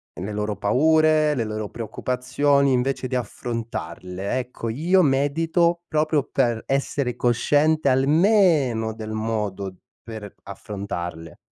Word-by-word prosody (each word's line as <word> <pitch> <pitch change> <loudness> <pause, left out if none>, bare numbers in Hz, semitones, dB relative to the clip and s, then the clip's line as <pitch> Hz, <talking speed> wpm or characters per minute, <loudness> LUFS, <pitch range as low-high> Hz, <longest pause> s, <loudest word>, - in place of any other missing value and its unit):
le 100 +4 -5
loro 105 0 -2
paure, 155 +7 +3
le 120 - 0
loro 110 -1 -4
preoccupazioni, 130 +5 0
invece 130 +1 0
di 130 - -3
affrontarle. 105 -4 -4
Ecco 125 -2 -5
io 170 +11 +2
medito 165 +4 +1
proprio 155 -1 +1
per 120 -5 0
essere 135 -2 -1
cosciente 145 +5 +2
almeno 140 - +3
del 110 -1 -7
modo 105 -3 -3 0.3
per 110 -3 -9
affrontarle. 90 -5 -6
125 Hz, 110 wpm, -23 LUFS, 110-145 Hz, 0.3 s, paure